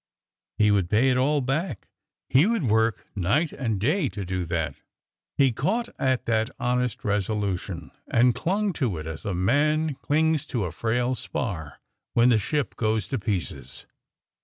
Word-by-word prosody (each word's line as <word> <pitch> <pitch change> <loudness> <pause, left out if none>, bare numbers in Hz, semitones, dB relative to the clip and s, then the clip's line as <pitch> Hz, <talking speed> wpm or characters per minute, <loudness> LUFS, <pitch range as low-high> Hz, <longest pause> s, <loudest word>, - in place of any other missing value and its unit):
He 105 -1 +4
would 95 -4 +2
pay 115 +6 +4
it 125 - +2
all 145 +3 +2
back; 135 - -2 0.4
he 140 +8 +5
would 230 -5 +1
work 110 -1 +2
night 110 - +1
and 115 -7 -2
day 145 - +1
to 100 0 -5
do 90 -1 -2
that. 80 -3 -1 0.6
He 135 -2 +5
caught 220 - -1
at 130 -2 +1
that 110 0 +1
honest 125 -1 -1
resolution, 100 -3 -2 0.2
and 120 +1 +4
clung 195 - 0
to 110 -10 +1
it 80 - -6
as 80 +5 -7
a 100 -3 -1
man 150 - +2
clings 155 +2 +1
to 115 -6 -1
a 85 - -4
frail 120 +6 0
spar 85 - -4 0.3
when 120 +1 +5
the 115 -3 +4
ship 145 +7 -1
goes 110 -3 0
to 135 - -1
pieces. 85 - -3
115 Hz, 160 wpm, -26 LUFS, 100-140 Hz, 0.6 s, he